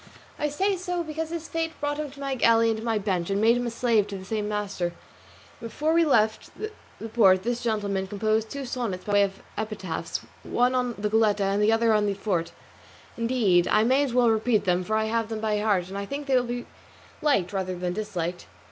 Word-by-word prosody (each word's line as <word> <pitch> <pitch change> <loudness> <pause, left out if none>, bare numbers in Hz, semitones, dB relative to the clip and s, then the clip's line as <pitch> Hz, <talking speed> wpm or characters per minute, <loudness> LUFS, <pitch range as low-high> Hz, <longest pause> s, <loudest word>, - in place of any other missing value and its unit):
I 295 - 0
say 385 +7 0
so 355 -1 -2
because 315 0 -4
his 335 -1 -5
fate 325 0 -3
brought 290 0 -2
him 300 -1 -3
to 280 +1 -14
my 275 -1 -2
galley 230 -2 +4
and 220 - -2
to - - -7
my 225 -2 +1
bench, 190 -4 -1
and 195 0 0
made 225 +2 +5
him 245 0 -1
a - - 0
slave 230 -3 +2
to 200 -1 -5
the 190 - -10
same 210 +1 -2
master; 205 -4 -2
and 175 +6 -11
before 310 +7 0
we 335 0 +5
left 220 -8 +2
the 430 - -8
port 190 -5 +4
this 240 +1 -1
gentleman 205 -4 -1
composed 215 +2 0
two 275 +2 -5
sonnets 235 -7 -3
by 205 - -2
way 205 - +6
of 195 0 -9 0.2
epitaphs, 195 -6 -4 0.2
one 245 +1 +1
on 250 -2 0
the 210 +1 -1
Goletta 210 -1 +2
and 195 +1 +1
the 210 +1 +4
other 225 0 +3
on 210 -1 +2
the 200 - 0
fort; 180 -5 -1 0.6
indeed, 230 -7 +2
I 215 - +4
may 260 +4 +3
as 275 - -2
well 240 -1 +4
repeat 220 0 +2
them, 180 0 +2
for 215 +4 -1
I 220 0 +1
have 225 0 -1
them 220 -1 -3
by 215 -1 0
heart, 205 -4 +1
and 195 - -6
I 200 - -5
think 285 +4 -4
they 270 -2 +2
will 250 -1 +3
be 240 0 -4 0.6
liked 205 - +1
rather 185 -1 -2
than 175 0 -2
disliked. 180 -4 -4
220 Hz, 230 wpm, -26 LUFS, 200-250 Hz, 0.6 s, way